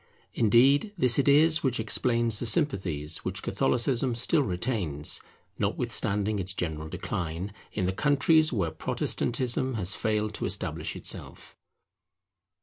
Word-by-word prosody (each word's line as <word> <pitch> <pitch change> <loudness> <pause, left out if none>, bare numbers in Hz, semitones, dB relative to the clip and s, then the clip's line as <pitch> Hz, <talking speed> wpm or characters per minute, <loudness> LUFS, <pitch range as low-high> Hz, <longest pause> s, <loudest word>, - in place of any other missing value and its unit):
Indeed 135 - +3
this 125 -5 +3
it 140 - +1
is 155 +3 +5
which 130 -4 -1
explains 115 0 +1
the 120 - -1
sympathies 85 - 0
which - - -5
Catholicism 125 0 0
still 150 +7 +2
retains, 90 - -2 0.4
notwithstanding 105 +1 0
its 95 +1 -3
general 80 -3 -4
decline, 85 +5 -5 0.2
in 95 - -2
the 95 - -1
countries 150 - +3
where 95 -9 -1
Protestantism 125 +9 -1
has 95 -3 +1
failed 105 -1 -1
to - - -4
establish 80 -4 -2
itself. - - -4
110 Hz, 125 wpm, -27 LUFS, 90-130 Hz, 0.4 s, is